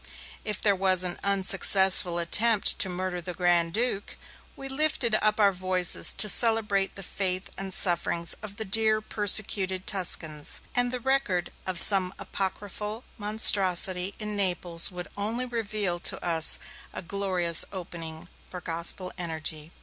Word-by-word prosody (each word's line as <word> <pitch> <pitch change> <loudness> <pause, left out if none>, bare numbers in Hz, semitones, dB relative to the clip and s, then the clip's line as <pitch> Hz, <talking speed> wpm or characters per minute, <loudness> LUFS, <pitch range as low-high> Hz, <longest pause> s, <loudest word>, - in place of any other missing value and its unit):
If 210 -2 -5
there 205 -2 +1
was 185 -1 +3
an 180 -1 -6
unsuccessful 190 -2 +3
attempt 210 +5 +4
to 190 - +3
murder 180 0 -6
the 175 +1 -8
Grand 175 -2 -1
Duke, 220 -1 -4 0.4
we 270 - -10
lifted 270 -4 -1
up 215 0 -1
our 200 -2 +2
voices 185 -1 0
to 210 - 0
celebrate 210 -3 +3
the 195 - -9
faith 185 0 -4
and 195 0 -8
sufferings 170 -2 -1
of 210 -2 -11
the 220 - -5
dear 215 +2 0
persecuted 200 -3 0
Tuscans, 160 -6 -2
and 245 0 -1
the 250 - -4
record 240 -9 -3 0.2
of 185 -2 -2
some 190 -2 +7
apocryphal 210 +3 -7 0.2
monstrosity 195 -3 +2
in 210 -1 -7
Naples 180 -4 0
would 180 -2 -9
only 225 +5 -3
reveal 215 -6 -3
to - - -2
us 165 -2 +5 0.3
a - - -10
glorious 180 -3 +2
opening 170 -3 -10 0.2
for 180 - -9
Gospel 170 +2 -3
energy. 160 -2 -6
190 Hz, 140 wpm, -24 LUFS, 175-210 Hz, 0.4 s, some